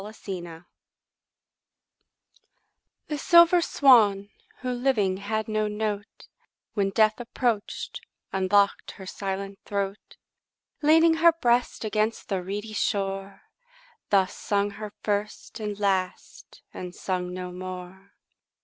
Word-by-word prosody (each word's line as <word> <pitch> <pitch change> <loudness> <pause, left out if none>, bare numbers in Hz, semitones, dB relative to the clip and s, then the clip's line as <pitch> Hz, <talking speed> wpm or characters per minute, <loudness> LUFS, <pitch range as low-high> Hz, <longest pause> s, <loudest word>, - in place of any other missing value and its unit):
6 215 +2 -10
Autoplay 175 -3 -7 2.4
The 300 -1 -2
silver 340 +3 +6
swan, 210 -10 +4 0.3
who 255 0 -2
living 240 -7 +1
had 215 +2 -3
no 215 -1 0
note, 210 0 -4 0.5
When 200 -2 +1
death 215 +3 +3
approach'd, 235 -3 -2 0.3
unlock'd 195 +1 +2
her 190 - -9
silent 195 +1 -5
throat; 200 0 -4 0.6
Leaning 325 +2 +5
her 335 +1 +6
breast 245 -7 +1
against 215 +1 -1
the 190 -3 -1
reedy 205 +4 -5
shore, 195 -1 -2 0.7
Thus 190 -2 +3
sung 205 0 0
her 210 +1 -7
first 210 +1 -3
and 210 -1 -4
last, 190 -3 -2
and 180 0 -7
sung 180 -1 -3
no 180 0 -5
more. 185 +1 -9
205 Hz, 110 wpm, -26 LUFS, 195-220 Hz, 2.4 s, silver